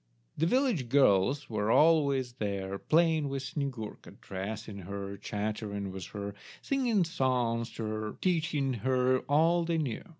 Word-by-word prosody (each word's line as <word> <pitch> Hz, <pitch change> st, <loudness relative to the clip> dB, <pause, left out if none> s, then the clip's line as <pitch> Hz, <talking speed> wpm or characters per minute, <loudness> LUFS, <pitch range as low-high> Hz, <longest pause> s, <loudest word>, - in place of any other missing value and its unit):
The 160 Hz, -, +1 dB
village 235 Hz, -, +1 dB
girls 130 Hz, +1 st, +3 dB
were 105 Hz, -1 st, -1 dB
always 140 Hz, -4 st, +4 dB
there 100 Hz, -2 st, -3 dB
playing 160 Hz, -2 st, +2 dB
with 135 Hz, -1 st, -3 dB
Snyegurka, 130 Hz, -7 st, -5 dB
dressing 100 Hz, +2 st, -6 dB
her, 100 Hz, +1 st, -6 dB
chattering 105 Hz, -1 st, -4 dB
with 95 Hz, -2 st, -6 dB
her, 100 Hz, -1 st, -6 dB, 0.3 s
singing 245 Hz, -8 st, +1 dB
songs 125 Hz, -8 st, 0 dB
to 115 Hz, -, -5 dB
her, 110 Hz, 0 st, -3 dB
teaching 155 Hz, -6 st, 0 dB
her 130 Hz, 0 st, +3 dB
all 165 Hz, +4 st, +4 dB
they 165 Hz, 0 st, 0 dB
knew. 140 Hz, -8 st, -2 dB
130 Hz, 135 wpm, -30 LUFS, 105-155 Hz, 0.3 s, always